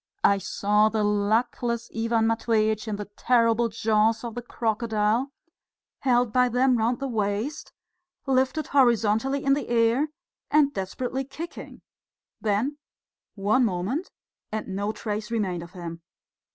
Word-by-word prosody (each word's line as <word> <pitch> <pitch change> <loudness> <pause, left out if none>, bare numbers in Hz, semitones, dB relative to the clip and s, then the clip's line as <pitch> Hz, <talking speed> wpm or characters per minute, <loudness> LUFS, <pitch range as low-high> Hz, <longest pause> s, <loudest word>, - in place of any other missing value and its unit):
I 200 0 +4
saw 210 +2 +2
the 220 -1 0
luckless 225 +3 0
Ivan 225 0 +1
Matveitch 220 -1 +1
in 215 - -2
the 205 0 -5
terrible 230 +2 +2
jaws 220 +1 +1
of 235 -2 -5
the 245 - -5
crocodile, 225 +1 0 0.7
held 245 -4 +2
by 250 -1 +4
them 250 0 +3
round 235 +2 +1
the 275 - -3
waist, 215 +4 -2 0.5
lifted 265 +3 +1
horizontally 245 0 +2
in 275 - +4
the 285 - -2
air 235 +5 +3 0.4
and 290 -2 +4
desperately 250 +6 -3
kicking. 305 +6 -9 0.6
Then 225 +8 0 0.6
one 210 +5 +2
moment, 225 - -1 0.4
and 215 -1 -4
no 200 +2 -2
trace 210 0 -4
remained 195 -7 -1
of 170 +1 -11
him. 170 -2 -7
225 Hz, 130 wpm, -26 LUFS, 210-250 Hz, 0.7 s, I